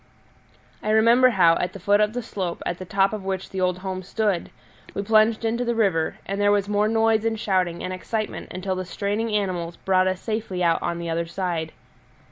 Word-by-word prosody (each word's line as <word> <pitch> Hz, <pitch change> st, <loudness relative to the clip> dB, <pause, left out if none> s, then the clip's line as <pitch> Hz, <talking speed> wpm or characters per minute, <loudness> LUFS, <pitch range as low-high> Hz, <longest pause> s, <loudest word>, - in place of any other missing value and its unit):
I 215 Hz, -, -3 dB
remember 230 Hz, +4 st, +5 dB
how, 175 Hz, -7 st, +4 dB
at 180 Hz, 0 st, -2 dB
the 195 Hz, -, -8 dB
foot 205 Hz, +3 st, +3 dB
of 210 Hz, +1 st, +2 dB
the 245 Hz, 0 st, -3 dB
slope 185 Hz, -6 st, -4 dB
at 175 Hz, -, -3 dB
the 185 Hz, -, -6 dB
top 195 Hz, +2 st, +2 dB
of 210 Hz, -3 st, -4 dB
which 190 Hz, -1 st, -4 dB
the 190 Hz, -, -3 dB
old 180 Hz, -1 st, +1 dB
home 185 Hz, -1 st, -3 dB
stood, 200 Hz, -1 st, -1 dB, 0.5 s
we 200 Hz, -, -2 dB
plunged 220 Hz, +2 st, +3 dB
into 235 Hz, +2 st, 0 dB
the 235 Hz, -1 st, -1 dB
river, 190 Hz, -8 st, +1 dB
and 195 Hz, +1 st, -3 dB
there 205 Hz, 0 st, +4 dB
was 205 Hz, -1 st, +2 dB
more 210 Hz, 0 st, +2 dB
noise 225 Hz, 0 st, +2 dB
and 225 Hz, -1 st, -1 dB
shouting 185 Hz, -5 st, 0 dB
and 185 Hz, -, -3 dB
excitement 215 Hz, +3 st, -4 dB
until 185 Hz, +1 st, -3 dB
the 185 Hz, -, -3 dB
straining 205 Hz, +5 st, -2 dB
animals 185 Hz, -5 st, -2 dB
brought 185 Hz, -1 st, +2 dB
us 185 Hz, 0 st, -1 dB
safely 215 Hz, -5 st, -3 dB
out 170 Hz, -1 st, +2 dB
on 170 Hz, -1 st, -2 dB
the 170 Hz, -1 st, -4 dB
other 165 Hz, +1 st, -1 dB
side. 170 Hz, -3 st, -3 dB
195 Hz, 215 wpm, -24 LUFS, 180-215 Hz, 0.5 s, remember